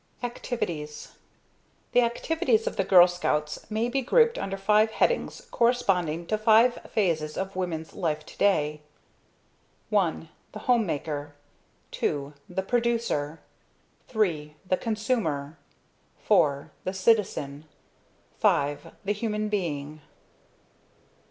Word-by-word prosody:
Activities 170 - -4 0.8
The 245 - +5
activities 235 -1 +1
of - - -2
the 195 - +1
Girl 180 -2 +7
Scouts 150 -4 -2
may 220 +2 0
be 270 +2 0
grouped 465 - +3
under 195 0 -3
five 210 +2 +3
headings 485 - 0
corresponding 190 -9 +1
to 215 +4 -1
five 225 +3 +5
phases 160 -7 0
of 190 0 -3
women's 165 -4 -3
life 155 -5 -2
today: 150 -7 +1 1.1
I. 165 -4 +1 0.2
The 215 - -6
Home 235 -4 +3
maker. 145 -1 -4 0.7
II. 140 0 -1 0.2
The 190 +2 -2
Producer. 230 -10 -1 0.7
III. 160 -10 -1
The 185 - +2
Consumer. 210 - -2 0.6
IV. 140 -1 +2
The 185 - -3
Citizen. 185 -8 +1 0.8
V. 145 +1 +3 0.3
The 205 - +1
Human 210 0 -2
Being. 155 -7 -3
190 Hz, 105 wpm, -27 LUFS, 150-225 Hz, 1.1 s, Girl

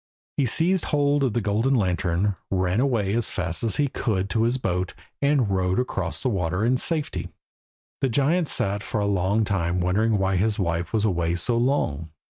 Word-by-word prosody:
He 135 - +2
seized 175 +9 +2
hold 145 -1 +2
of 130 -5 +1
the 120 - 0
golden 110 +6 +1
lantern, 95 -1 +1 0.2
ran 95 +1 0
away 115 -7 +1
as 115 -1 +1
fast 85 -4 -3
as 115 - +1
he 145 - +2
could 100 -7 -2
to 115 - +1
his 120 +2 +1
boat, 90 -6 -2 0.3
and 140 -7 +2
rowed 95 -1 +1
across 95 -9 -3
the 130 - +1
water 90 -1 -1
in 125 +2 +3
safety. 155 +1 -1 0.7
The 135 - +1
giant 150 +7 +2
sat 100 -5 0
for 110 - -3
a 100 - 0
long 100 +2 +1
time 90 -3 -1
wondering 105 +5 +1
why 95 -1 +1
his 105 +3 +1
wife 85 -2 -1
was 110 -1 +1
away 85 -4 0
so 90 +7 +1
long. 115 - 0
105 Hz, 190 wpm, -24 LUFS, 90-125 Hz, 0.7 s, in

